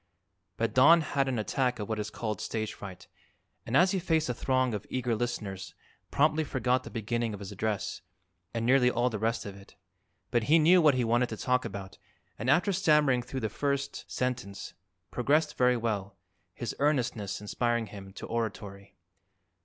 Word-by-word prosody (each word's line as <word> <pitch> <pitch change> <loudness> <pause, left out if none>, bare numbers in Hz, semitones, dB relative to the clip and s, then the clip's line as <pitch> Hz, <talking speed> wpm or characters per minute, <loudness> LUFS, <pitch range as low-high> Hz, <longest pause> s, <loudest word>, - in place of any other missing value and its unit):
But 115 -2 -1
Don 160 +7 +7
had 140 -2 0
an 130 -2 -1
attack 125 +3 0
of 105 - -5
what 110 -1 -2
is 105 +1 -3
called 110 -3 -4
"stage 110 -1 -3
fright" 95 -3 -10 0.6
and 125 - +2
as 185 +1 +5
he 195 - 0
faced 160 -3 +1
the 125 - -1
throng 130 0 0
of 105 -1 -5
eager 125 -2 -1
listeners 100 -6 -4 0.3
promptly 155 +2 +2
forgot 130 -3 0
the - - -8
beginning 115 -1 -2
of - - -11
his 100 0 -7
address 105 0 -3 0.5
and 115 -1 -2
nearly 125 0 +5
all 125 +1 +1
the 110 - -3
rest 115 +2 -1
of 100 -1 -7
it. 100 0 -16 0.6
But 120 -2 +1
he 160 +6 +5
knew 170 +3 +6
what 150 -4 +5
he 125 - +1
wanted 120 +2 +2
to 110 - -5
talk 125 +2 +1
about 95 -1 -7 0.4
and 115 +4 -2
after 180 +8 +3
stammering 150 -8 +3
through 130 +2 -5
the 110 - 0
first 140 +3 -3
sentence, 125 -6 -3 0.4
progressed 150 +5 +1
very 125 0 +3
well, 105 -4 -3 0.4
his - - -4
earnestness 125 -8 0
inspiring 115 +2 -1
him 100 -2 -10
to - - -8
oratory. 100 -4 -5
120 Hz, 180 wpm, -29 LUFS, 110-135 Hz, 0.6 s, Don